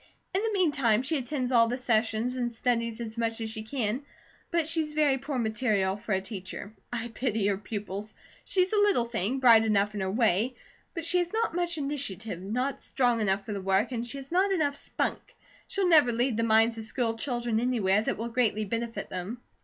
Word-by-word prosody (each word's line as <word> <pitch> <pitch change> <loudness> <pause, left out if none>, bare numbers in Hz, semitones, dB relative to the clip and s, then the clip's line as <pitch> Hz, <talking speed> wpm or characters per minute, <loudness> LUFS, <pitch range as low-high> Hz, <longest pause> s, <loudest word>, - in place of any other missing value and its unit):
In 380 - +1
the 445 0 0
meantime, 275 - +2
she 305 +2 0
attends 260 0 -2
all 230 -2 +5
the 245 +2 -2
sessions 230 0 +1
and 240 -2 -1
studies 230 -1 -1
as 230 0 -5
much 230 0 -1
as 220 -1 -3
she 220 - -5
can; 225 +1 -2 0.5
but 335 -2 +1
she's 315 -2 +1
very 295 -3 +2
poor 275 +1 -4
material 215 -4 +1
for 210 +1 -4
a 190 - +2
teacher. 195 +1 -7 0.2
I 240 -1 -3
pity 225 -3 -1
her 200 -1 +1
pupils. 205 0 -6 0.3
She's 370 +1 +1
a - - +3
little 405 -12 +3
thing, 235 +1 -1
bright 235 -4 +7
enough 210 -1 +2
in 205 - -4
her 190 0 -1
way, 225 +3 +2 0.4
but 330 -2 -2
she 360 +1 +5
has 350 -1 -1
not 450 -4 0
much 345 -1 0
initiative, 225 - -3
not 250 +8 -2
strong 245 -3 +1
enough 195 -1 0
for 215 - -4
the 200 - -4
work, 195 +5 +1
and 235 -2 -2
she 240 +3 -5
has 275 +1 -9
not 380 +3 +3
enough 300 -6 +1
spunk. 285 - -2 0.5
She'll 390 -2 +1
never 305 -8 +6
lead 240 +1 0
the 230 - 0
minds 225 +1 +4
of - - -5
school 225 0 -1
children 240 -2 -1
anywhere 215 -5 +2
that - - -2
will 230 +2 -4
greatly 230 -3 +1
benefit 230 0 -4
them." 185 +6 -5
235 Hz, 210 wpm, -28 LUFS, 215-275 Hz, 0.5 s, bright